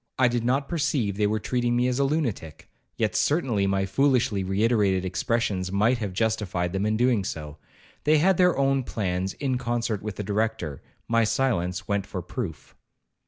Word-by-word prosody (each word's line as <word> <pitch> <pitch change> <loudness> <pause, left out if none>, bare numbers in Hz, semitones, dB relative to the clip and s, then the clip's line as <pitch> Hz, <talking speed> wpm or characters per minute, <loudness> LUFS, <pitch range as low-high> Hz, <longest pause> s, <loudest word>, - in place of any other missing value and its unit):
I 130 - +5
did 120 -1 -1
not 135 +3 +1
perceive 140 - 0
they 105 0 +2
were 110 +1 0
treating 120 +2 0
me 125 +1 +2
as 125 +1 -1
a - - +3
lunatic, 135 - -2 0.3
yet - - 0
certainly 125 - +1
my 95 0 +1
foolishly 115 -2 +2
reiterated 100 -1 +1
expressions 95 -1 -1
might 110 +5 +2
have 105 -4 -3
justified 95 -4 -1
them 100 +2 0
in 110 0 +1
doing 120 -4 +2
so,—they 80 - -3
had 185 +4 +3
their 180 -4 +4
own 135 0 +2
plans 95 -5 -2
in 130 -3 -2
concert 120 -4 -1
with 105 -2 -5
the 105 - -4
Director,—my 110 +1 -2
silence 95 -7 0
went 100 -1 -1
for 90 -3 -5
proof. 90 - -6
110 Hz, 165 wpm, -25 LUFS, 95-125 Hz, 0.3 s, I